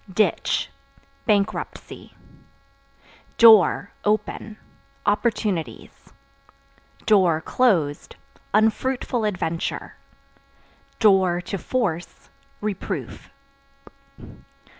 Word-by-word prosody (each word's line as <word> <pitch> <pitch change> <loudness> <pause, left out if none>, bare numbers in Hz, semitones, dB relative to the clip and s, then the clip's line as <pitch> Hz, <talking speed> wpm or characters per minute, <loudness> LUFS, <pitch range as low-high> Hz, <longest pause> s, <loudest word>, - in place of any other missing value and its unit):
Ditch 215 +3 0 0.6
Bankruptcy. 205 -3 -2 1.2
Door 220 -3 +6
(Open) 215 0 -2 0.5
opportunities; 205 - -2 1.3
(closed) 170 - 0 0.4
unfruitful 225 +2 0
adventure; 175 -5 -3 1.0
(to 190 -2 +2
force) 180 -10 -3 0.3
reproof. 205 -2 -5
205 Hz, 45 wpm, -23 LUFS, 180-220 Hz, 1.3 s, Door